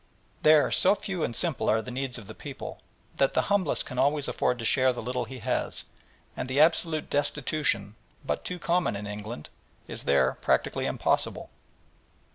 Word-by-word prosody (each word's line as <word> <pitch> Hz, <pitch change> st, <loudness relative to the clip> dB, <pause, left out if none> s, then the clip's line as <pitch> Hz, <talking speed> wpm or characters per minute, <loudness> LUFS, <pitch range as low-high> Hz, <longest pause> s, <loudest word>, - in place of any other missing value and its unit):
There 155 Hz, -1 st, +5 dB
so 195 Hz, +3 st, +5 dB
few 185 Hz, -5 st, -4 dB
and 115 Hz, -, -2 dB
simple 165 Hz, -8 st, 0 dB
are 110 Hz, -, +4 dB
the 125 Hz, +3 st, -6 dB
needs 130 Hz, 0 st, -2 dB
of 110 Hz, -, -9 dB
the 110 Hz, -, -9 dB
poor 140 Hz, +2 st, -8 dB, 0.4 s
that 135 Hz, -, +2 dB
the -, -, +4 dB
humblest 190 Hz, -7 st, +1 dB
can 125 Hz, -2 st, -5 dB
always 145 Hz, +1 st, +2 dB
afford 125 Hz, -, 0 dB
to 115 Hz, -, -5 dB
share 130 Hz, +2 st, +4 dB
the 120 Hz, -, -5 dB
little 125 Hz, +1 st, -2 dB
he 130 Hz, +3 st, -8 dB
has, 115 Hz, -, -2 dB, 0.5 s
and 130 Hz, -, -4 dB
the 130 Hz, +2 st, +1 dB
absolute 160 Hz, 0 st, +3 dB
destitution, 145 Hz, -7 st, 0 dB, 0.3 s
but -, -, -2 dB
too 180 Hz, -, -4 dB
common 175 Hz, -, +1 dB
in 100 Hz, +1 st, -5 dB
England, 105 Hz, -4 st, -7 dB, 0.4 s
is -, -, -5 dB
there 65 Hz, -2 st, +2 dB
practically -, -, +1 dB
impossible. -, -, -1 dB
130 Hz, 175 wpm, -28 LUFS, 115-155 Hz, 0.5 s, There